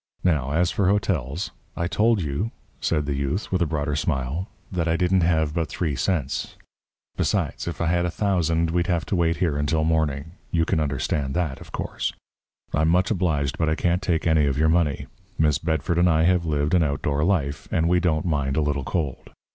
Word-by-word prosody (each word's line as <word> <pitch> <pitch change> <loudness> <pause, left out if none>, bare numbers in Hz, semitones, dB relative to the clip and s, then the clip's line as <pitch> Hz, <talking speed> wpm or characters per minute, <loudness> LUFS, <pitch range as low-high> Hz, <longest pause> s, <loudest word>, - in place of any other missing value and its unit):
Now, 75 -7 +2
as 85 +2 +2
for 100 - +1
hotels 90 -7 0
" - - -31
"I 85 - 0
told 105 +2 +2
you," 75 +9 -2 0.3
said 75 -3 0
the 70 - -1
youth, 70 +8 -2
with 95 -1 +1
a 85 - +3
broader 75 -1 -1
smile, 75 +4 -1 0.2
"that 85 -3 -1
I 85 0 +2
didn't 90 +1 +2
have 80 -3 +2
but 85 -1 -1
three 80 -6 -2
cents. 70 +1 -1 0.6
Besides, - - -1
if 85 - -4
I 85 - 0
had 85 +1 +1
a - - 0
thousand, 85 -4 +1
we'd 85 0 +1
have 85 -1 0
to - - -1
wait 85 -1 +2
here 85 -6 0
until 75 +2 +1
morning. 80 -1 0 0.2
You 80 -1 +1
can 85 - +1
understand 70 -1 -1
that, 80 -7 -1
of - - -12
course. - - -3 0.6
I'm 80 +2 +2
much 90 +5 +2
obliged, 75 -8 0
but 80 -1 +2
I 80 - +1
can't 90 +2 +1
take 85 -4 0
any 80 -3 +3
of 70 -1 0
your 80 +1 +3
money. 80 -5 +1 0.3
Miss 75 -3 +3
Bedford 80 +1 0
and 90 0 +5
I 80 -1 +3
have 90 -1 +2
lived 75 0 0
an 90 - +5
outdoor 70 0 0
life, 80 -6 0
and 80 0 +2
we 90 +1 +3
don't 80 -3 +1
mind 70 -5 0
a - - +3
little 75 -2 0
cold. 75 -3 -3
80 Hz, 210 wpm, -24 LUFS, 75-90 Hz, 0.6 s, and